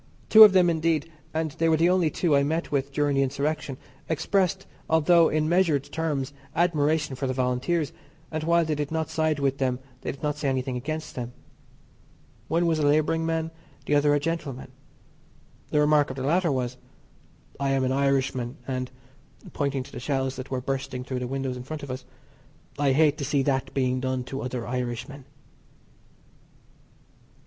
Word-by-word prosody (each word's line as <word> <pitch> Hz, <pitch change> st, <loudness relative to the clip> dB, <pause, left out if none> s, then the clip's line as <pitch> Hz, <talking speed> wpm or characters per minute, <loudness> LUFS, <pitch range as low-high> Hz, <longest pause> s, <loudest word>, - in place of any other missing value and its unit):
Two 220 Hz, 0 st, +11 dB
of 210 Hz, -3 st, +9 dB
them, 185 Hz, -2 st, +5 dB
indeed, 165 Hz, -1 st, 0 dB, 0.2 s
and 160 Hz, -1 st, -1 dB
they 165 Hz, +2 st, +1 dB
were 160 Hz, -, +4 dB
the 170 Hz, +3 st, +4 dB
only 180 Hz, -3 st, +3 dB
two 155 Hz, 0 st, +1 dB
I 140 Hz, -, +4 dB
met 160 Hz, +4 st, -1 dB
with 140 Hz, -1 st, -1 dB
during 145 Hz, 0 st, +1 dB
the 135 Hz, -, +3 dB
insurrection, 140 Hz, +1 st, -2 dB, 0.3 s
expressed, 190 Hz, +4 st, 0 dB, 0.2 s
although 160 Hz, +1 st, +5 dB
in 155 Hz, 0 st, +1 dB
measured 165 Hz, -5 st, +2 dB
terms, 145 Hz, -2 st, -3 dB, 0.2 s
admiration 155 Hz, -4 st, +1 dB
for 130 Hz, +1 st, -3 dB
the 130 Hz, -, -2 dB
Volunteers, 130 Hz, +5 st, 0 dB, 0.4 s
and 155 Hz, -1 st, -3 dB
while 170 Hz, +1 st, +3 dB
they 155 Hz, -, -1 dB
did 150 Hz, -1 st, -2 dB
not 160 Hz, 0 st, -2 dB
side 155 Hz, -1 st, +1 dB
with 140 Hz, -1 st, 0 dB
them 130 Hz, -2 st, +1 dB, 0.2 s
they -, -, -3 dB
did 140 Hz, -, -13 dB
not 150 Hz, 0 st, -1 dB
say 145 Hz, -2 st, -1 dB
anything 130 Hz, -1 st, -1 dB
against 155 Hz, +5 st, -4 dB
them. 125 Hz, -1 st, -5 dB, 1.1 s
One 170 Hz, +2 st, +1 dB
was 165 Hz, -2 st, +1 dB
a 145 Hz, -, +2 dB
labouring 155 Hz, +2 st, +2 dB
man, 165 Hz, 0 st, -1 dB, 0.3 s
the -, -, 0 dB
other 145 Hz, 0 st, +4 dB
a -, -, +2 dB
gentleman. 145 Hz, -4 st, -4 dB, 1.0 s
The 150 Hz, -, +2 dB
remark 150 Hz, -1 st, +4 dB
of 130 Hz, -, -5 dB
the 130 Hz, -, -4 dB
latter 170 Hz, +4 st, +2 dB
was: 125 Hz, -2 st, -2 dB, 0.8 s
"I 140 Hz, 0 st, 0 dB
am 135 Hz, -1 st, +1 dB
an 130 Hz, -, +1 dB
Irishman, 135 Hz, -2 st, 0 dB
and 130 Hz, -1 st, -3 dB, 0.6 s
(pointing 140 Hz, -2 st, -1 dB
to -, -, -14 dB
the -, -, -7 dB
shells 135 Hz, 0 st, -1 dB
that 130 Hz, -, -7 dB
were 130 Hz, -1 st, -2 dB
bursting 130 Hz, -1 st, -3 dB
through 130 Hz, 0 st, -4 dB
the 125 Hz, -, -3 dB
windows 135 Hz, -1 st, -3 dB
in 125 Hz, -, -7 dB
front 150 Hz, +3 st, -7 dB
of 140 Hz, -, -5 dB
us) 130 Hz, 0 st, -6 dB, 0.7 s
I 140 Hz, -2 st, +3 dB
hate 150 Hz, +1 st, +3 dB
to -, -, -2 dB
see 140 Hz, 0 st, +1 dB
that 135 Hz, -1 st, 0 dB
being 130 Hz, -1 st, +1 dB
done 130 Hz, 0 st, -2 dB
to 135 Hz, +2 st, -5 dB
other 125 Hz, -2 st, -4 dB
Irishmen." 125 Hz, +2 st, -4 dB
145 Hz, 185 wpm, -26 LUFS, 130-160 Hz, 1.1 s, Two